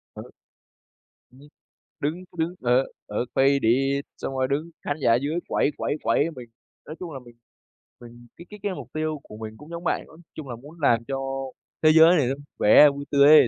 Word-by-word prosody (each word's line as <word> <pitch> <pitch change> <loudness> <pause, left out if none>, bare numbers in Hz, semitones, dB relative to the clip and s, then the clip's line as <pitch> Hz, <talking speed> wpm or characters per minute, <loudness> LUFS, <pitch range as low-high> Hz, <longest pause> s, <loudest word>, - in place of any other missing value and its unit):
Ừ. - - -7 1.1
Ừm, 130 - -19 0.6
đứng, 165 +6 -3
cứ - - -19
đứng 165 +3 -1
ở 125 +2 +3 0.2
ở 105 +4 -2
"Faded," 135 0 +3 0.2
xong 135 - -5
rồi 130 0 +1
đứng 150 +5 -2
khán 145 - -2
giả 115 -2 +4
dưới 145 +7 -1
quẩy, 145 - +1
quẩy, - - -1
quẩy 145 +8 +2
mình 120 -2 -10 0.4
nói 155 - -7
chung 175 -3 -6
là 135 - -6
mình 120 -1 -16 0.7
mình 120 0 -14
cái 170 - -12
cái 210 -1 -11
cái 205 -2 -1
mục - - -9
tiêu 155 -1 -2
của 105 - -12
mình 110 0 -8
cũng 150 +3 -13
giống 170 +1 -7
bạn. - - 0
Nói 160 - -16 0.2
chung 150 -4 -8
là 120 - -5
muốn 150 +7 -14
làm 115 -5 +3
cho 135 - -2 0.7
thế 155 - +6
giới 165 +2 +7
này 140 -5 +2
nó 135 - 0
vui 145 +1 -14 0.2
vẻ, 150 +6 +9
vui 140 0 -6
tươi 140 0 +6
ấy 155 -1 +10
140 Hz, 215 wpm, -25 LUFS, 125-155 Hz, 1.1 s, ấy